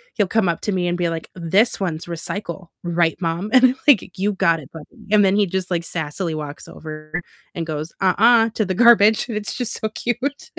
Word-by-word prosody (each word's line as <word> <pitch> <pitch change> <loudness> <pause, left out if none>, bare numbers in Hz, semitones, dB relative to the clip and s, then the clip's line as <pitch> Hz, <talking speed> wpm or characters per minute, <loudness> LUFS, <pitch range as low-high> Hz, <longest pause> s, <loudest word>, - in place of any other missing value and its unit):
he'll 205 -3 +1
come 210 -1 +1
up 165 - -2
to 210 - -2
me 180 -2 -1
and 175 0 -1
be 175 -1 0
like, 165 -1 -5
"This 190 +6 +1
one's 170 -5 -3
recycle, 175 +1 -6
right, 170 -1 +1
Mom?" 170 +5 -2
And 255 0 +7
I'm 255 0 +3
like, 210 - +3
"You 205 +2 0
got 165 -3 +2
it, 140 - -13
buddy," 190 - -13
and 210 -1 +5
then 195 0 +3
he 205 0 +3
just, 185 0 -3
like, 170 -2 -1
sassily 165 +1 -3
walks 150 -2 -7
over 155 +2 -7 0.3
and 165 - -4
goes, 155 +1 -5
"Uh-uh," 225 +4 +4
to 215 - 0
the 185 - -2
garbage, 220 0 +5
and 220 - -3
it's 210 -1 -3
just 245 -2 -3
so 220 - -2
cute. 245 - -3
185 Hz, 220 wpm, -21 LUFS, 165-215 Hz, 0.3 s, And